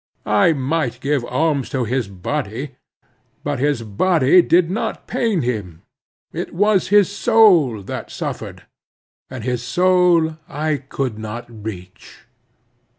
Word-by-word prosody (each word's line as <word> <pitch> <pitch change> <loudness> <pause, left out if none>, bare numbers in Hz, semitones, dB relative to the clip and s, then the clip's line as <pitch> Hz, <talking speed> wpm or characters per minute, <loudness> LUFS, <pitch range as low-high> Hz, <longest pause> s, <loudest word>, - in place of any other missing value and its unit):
I 105 +10 +4
might 135 -2 -2
give 140 -1 0
alms 140 +1 0
to 130 -3 -1
his 125 0 -1
body; 115 +6 -4 0.7
but - - -2
his 145 -3 0
body 155 - +3
did 170 0 +3
not 210 - -3
pain 220 - 0
him; 100 -9 -4 0.5
it - - -5
was 205 +1 +2
his 205 -1 +5
soul 200 - +4
that - - -6
suffered, - - -6 0.7
and 130 -4 -7
his 125 -1 -2
soul 175 +2 +2
I 150 +1 -1
could 130 -4 -4
not 110 +2 -6
reach. 105 -5 -10
135 Hz, 125 wpm, -20 LUFS, 115-170 Hz, 0.7 s, his